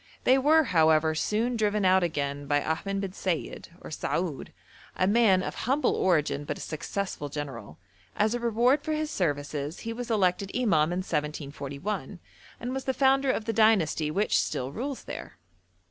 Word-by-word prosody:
They 260 +1 +5
were, 315 +4 +5
however, 160 - +3
soon 220 +9 0
driven 210 -2 +1
out 185 0 +5
again 145 -4 -2
by 145 0 +2
Ahmed 195 +5 -2
bin 195 -2 -4
Sayid, 185 -3 -3
or - - -9
Saoud, 160 -1 -3 0.4
a 185 - +1
man 200 -3 +4
of - - -4 0.2
humble 280 +3 +2
origin 155 -5 +1
but - - -4
a - - -11
successful 160 -1 -4
general; 130 - -7 0.4
as 215 +2 +2
a 240 - -1
reward 240 +4 +2
for 310 - -2
his 305 0 -2
services 145 -2 -2
he 230 - -4
was 245 +1 -6
elected 195 -3 +1
imam 175 -11 +2
in 180 - -1
1741, 150 +4 -4 0.4
and 245 +2 -4
was 265 0 -4
the 265 - -1
founder 270 0 +3
of 225 - 0
the 225 - -1
dynasty 200 -8 +3
which 200 +7 +2
still 130 +1 -2
rules 265 - -5
there. - - -8
190 Hz, 170 wpm, -27 LUFS, 150-235 Hz, 0.4 s, They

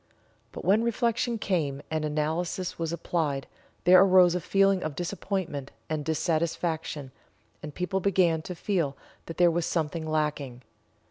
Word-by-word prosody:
But - - -8
when 200 +5 +4
reflection 235 0 0
came, 155 -9 -1
and 155 -1 -1
analysis 160 +5 -2
was 165 -1 -2
applied 155 -5 -1 0.4
there 180 +2 +8
arose 185 -2 +6
a 180 - -1
feeling 195 +2 +3
of 155 -4 -4
disappointment 175 -5 -3 0.2
and 155 -1 -1
dissatisfaction, 160 -2 -1 0.5
and 150 -1 -8
people 180 +2 -1
began 180 -4 +2
to 180 +3 -7
feel 165 -7 -1 0.3
that 165 - -7
there 175 -1 +5
was 170 0 -1
something 160 -1 -2
lacking. 150 -5 -2
165 Hz, 140 wpm, -27 LUFS, 155-185 Hz, 0.5 s, there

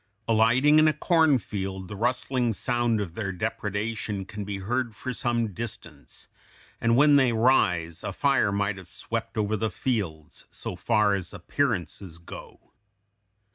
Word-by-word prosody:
Alighting 120 +7 +5
in 155 - +5
a 155 - +3
cornfield 110 - +1
the 105 - -7
rustling 125 +1 0
sound 120 0 0
of 95 -5 -4
their 100 0 -3
depredation 105 0 -3
can 105 +1 -6
be 100 0 -4
heard 115 +3 -2
for 130 +3 -5
some 115 -3 -1
distance; 90 -10 -8 0.5
and 115 0 +3
when 145 +2 +6
they 130 -3 +4
rise, 90 -9 +2
a - - -3
fire 135 -7 +2
might 100 0 -1
have 90 -2 -13
swept 115 +4 -5
over 105 0 +1
the 110 +1 -1
fields, 90 - -3
so - - -6
far 105 0 +2
as 95 0 -3
appearances 95 - -2
go. 85 - -12
110 Hz, 145 wpm, -26 LUFS, 95-120 Hz, 0.5 s, when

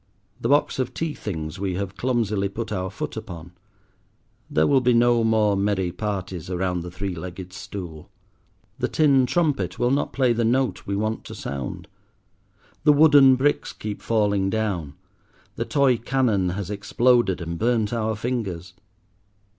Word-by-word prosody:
The - - -2
box 145 -1 +2
of 130 - -2
tea 160 -2 -2
things 80 - -5
we 95 -2 -2
have 100 +1 -4
clumsily 110 -6 0
put 110 +3 -5
our 95 -2 -2
foot - - -5
upon; 85 -1 -8 1.0
there 80 - +2
will 135 -2 +4
be 125 -1 +3
no 120 0 +4
more 110 -2 +3
merry 100 -2 0
parties 95 -3 -4
around 90 -1 -1
the 90 - -7
three 95 +2 -4
legged 90 +1 -8
stool. 90 -4 -8 0.7
The - - 0
tin 140 -5 +3
trumpet 135 - 0
will 120 +1 +1
not 140 - 0
play 130 -3 +2
the 115 0 0
note 125 +3 0
we 100 - -1
want 110 +2 -2
to - - -8
sound; 70 -2 -5 1.0
the 150 - +6
wooden 145 -3 +7
bricks 140 +3 0
keep 105 -1 -6
falling 100 -3 +1
down; 95 -9 -2 0.6
the - - -2
toy 135 -4 +3
cannon 115 -6 +1
has 100 -1 -4
exploded 115 0 +2
and 85 -1 -5
burnt 115 -2 +1
our 110 -1 -1
fingers. 100 -7 -4
105 Hz, 155 wpm, -24 LUFS, 90-125 Hz, 1.0 s, wooden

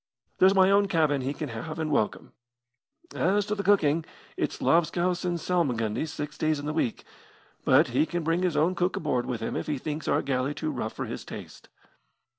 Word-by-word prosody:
There's 190 +1 +6
my 190 0 +5
own 200 0 +4
cabin 155 -6 +2
he 130 +2 -2
can 150 0 -5
have 140 +8 -6
and 155 -1 -2
welcome. 110 -7 -1 0.8
As 200 +4 +1
to 210 - -2
the 205 - -2
cooking, 165 -6 +3 0.3
it's - - -2
lobscouse 175 +2 +2
and 175 -1 0
salmagundy 145 -8 0
six 150 0 -6
days 155 -1 +1
in 145 - -6
the 150 - -2
week; 140 -7 -1 0.6
but 140 +2 +5
he 130 +6 +2
can 175 -1 -3
bring 165 +3 +1
his 175 -4 0
own 160 +5 +3
cook 180 +1 0
aboard 130 -6 -1
with 120 -3 -3
him 115 - -3
if - - -3
he 150 -2 -1
thinks 150 +3 -5
our - - +2
galley 135 +1 -1
too 155 -1 -2
rough 110 - -4
for - - -4
his - - -6
taste." - - -10
155 Hz, 205 wpm, -27 LUFS, 140-180 Hz, 0.8 s, There's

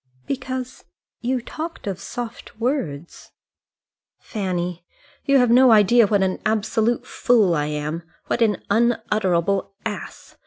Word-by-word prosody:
"Because 260 -1 -4 0.4
you 250 0 -1
talked 325 +6 -6
of 195 -3 -3
soft 235 -2 -7
words." 180 - -3 0.8
"Fanny, 180 -4 -3 0.4
you 275 0 +4
have 245 -2 +4
no 255 +1 +7
idea 220 +1 +6
what 200 -1 +2
an 185 -1 -1
absolute 220 +2 0
fool 220 -8 +3
I 150 -2 0
am, 150 +2 -3 0.2
what - - -1
an 215 -3 +2
unutterable 200 -5 +1
ass. 210 -2 -7
215 Hz, 120 wpm, -22 LUFS, 185-240 Hz, 0.8 s, no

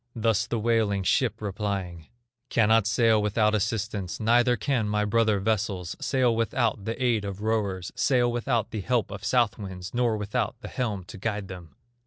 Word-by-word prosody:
Thus 115 -2 +1
the 120 - -1
wailing 110 -3 +1
ship 125 +5 +1
replying: 95 -5 -4 0.4
"Cannot 110 -1 +3
sail 115 -1 +3
without 105 +1 +2
assistance, 105 -2 -2
Neither 120 +2 +3
can 110 0 0
my 105 0 +1
brother 110 -1 +2
vessels 100 -4 -1
Sail 130 -4 +1
without 115 -2 0
the 115 - -3
aid 120 -5 +1
of 100 0 -6
rowers, 100 -5 -1
Sail 125 -1 +2
without 120 -2 -1
the 110 - -3
help 120 0 0
of 100 0 -7
south 120 0 +1
winds, 95 -3 -7
Nor 120 -2 +1
without 105 +2 -2
the 105 - -7
helm 110 -7 -2
to 105 +3 -11
guide 105 -2 -3
them." 90 -5 -10
110 Hz, 170 wpm, -26 LUFS, 100-115 Hz, 0.4 s, Cannot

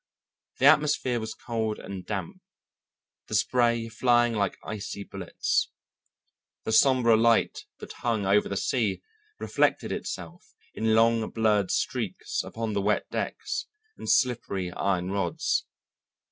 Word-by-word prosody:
The 130 - +1
atmosphere 145 -4 +4
was 110 0 -5
cold 110 -2 -3
and 95 -1 -7
damp, 95 -4 -5 0.9
the - - -3
spray 120 -2 +2
flying 120 +1 +2
like 100 -3 -1
icy 100 -1 -5
bullets. 95 -3 -1 0.9
The - - -3
sombre 120 -1 +5
light 115 +1 +2
that - - -9
hung 115 -4 -1
over 100 +2 +3
the 100 - -2
sea 110 -6 0 0.3
reflected - - 0
itself 175 +1 -6 0.2
in 110 0 +1
long 115 0 +3
blurred 105 -4 +1
streaks - - -2
upon 115 -1 -4
the 100 - 0
wet 105 +2 0
decks - - -3 0.3
and - - -7
slippery 115 -8 +1
iron 95 -1 -1
rods. 95 -4 -1
110 Hz, 125 wpm, -27 LUFS, 100-120 Hz, 0.9 s, sombre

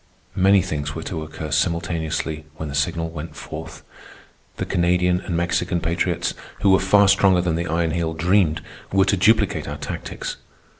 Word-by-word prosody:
Many 95 0 +5
things 75 -1 -3
were 80 - -5
to 85 -6 -4
occur 80 0 -6
simultaneously 80 -1 -1
when 80 -1 -5
the - - -6
signal 80 +3 -1
went 80 0 -7
forth. 80 +1 -8 0.7
The - - -2
Canadian 90 +1 +2
and 85 -5 -3
Mexican 85 +1 0
patriots, 85 +1 -1 0.3
who 100 - +4
were 95 - +5
far 100 +1 +5
stronger 95 -2 +4
than 85 -2 0
the 85 +1 -2
Iron 80 0 0
Heel 80 -1 -1
dreamed, 85 -2 +2 0.3
were 95 0 +4
to 100 - +2
duplicate 110 +4 +2
our - - -5
tactics. - - -5
85 Hz, 165 wpm, -22 LUFS, 80-95 Hz, 0.7 s, Many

